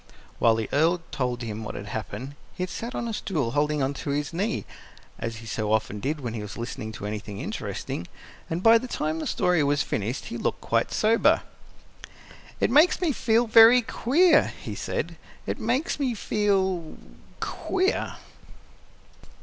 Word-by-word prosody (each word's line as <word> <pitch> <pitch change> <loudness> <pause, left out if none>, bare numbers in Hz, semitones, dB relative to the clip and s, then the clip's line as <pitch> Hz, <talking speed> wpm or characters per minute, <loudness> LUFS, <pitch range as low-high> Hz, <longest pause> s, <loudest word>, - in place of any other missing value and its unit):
While 115 -1 +5
the 110 -2 -2
Earl 165 +4 +3
told 125 -4 -2
him 110 -1 -5
what - - -6
had 100 - -6
happened, 110 +4 -5 0.2
he 185 - -3
had 185 - -4
sat 235 +3 -5
on 235 - -2
a 225 - -3
stool 150 - -1
holding 150 +1 +1
on 135 +1 0
to 140 - -6
his 145 +3 -1
knee, 200 +7 -1 0.5
as 115 0 -3
he 115 +1 -10
so 110 -1 -2
often 110 -1 0
did 145 +6 -2
when 120 -3 -4
he 110 - -4
was 105 -1 -7
listening 115 -2 -5
to 105 - -7
anything 105 -1 -5
interesting; 85 - -4 0.4
and 165 +3 -2
by 230 0 +7
the 255 - -6
time 155 -8 -2
the - - -3
story 175 -4 +2
was 145 0 +2
finished 115 +6 -3
he 120 - -5
looked - - -1
quite 115 0 0
sober. 225 +2 +3 1.2
"It - - +2
makes 305 +7 +5
me 350 -4 +1
feel 230 -2 +2
very 230 +2 +8
queer," 300 +8 +4
he - - -6
said; - - -3 0.3
"it - - -3
makes 295 +4 0
me 260 -4 0
feel 190 -6 0 0.4
queer!" 385 +3 -1
150 Hz, 175 wpm, -26 LUFS, -, 1.2 s, very